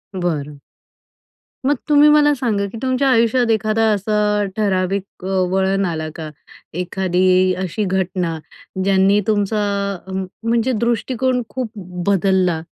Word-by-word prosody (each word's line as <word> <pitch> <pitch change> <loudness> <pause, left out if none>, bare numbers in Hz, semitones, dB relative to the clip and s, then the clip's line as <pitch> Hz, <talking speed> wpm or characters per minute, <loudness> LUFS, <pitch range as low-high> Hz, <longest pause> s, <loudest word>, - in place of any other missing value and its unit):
बरं. 150 -5 -3 1.1
मग 290 - +3
तुम्ही 295 0 +6
मला 295 -1 +5
सांगा, 220 -6 -1
की 230 - -8
तुमच्या 260 +1 +1
आयुष्यात 235 +1 +2
एखादा 220 0 +1
असा 210 0 0
ठराविक 195 -2 -2
अ, - - -3 0.2
वळण 195 +1 +1
आला 160 -3 -3
का? 155 -2 -6 0.4
एखादी 185 +1 +1
अशी 190 +4 -2
घटना, 180 -3 -1 0.5
ज्यांनी 195 +1 +3
तुमचा 210 0 +1 0.5
अ, 190 - -8
म 190 0 -2 0.2
म्हणजे 235 +2 +1
दृष्टिकोन 250 +2 0
खूप 255 -4 -4 0.4
बदलला? 190 -3 +2
200 Hz, 120 wpm, -19 LUFS, 185-230 Hz, 1.1 s, तुम्ही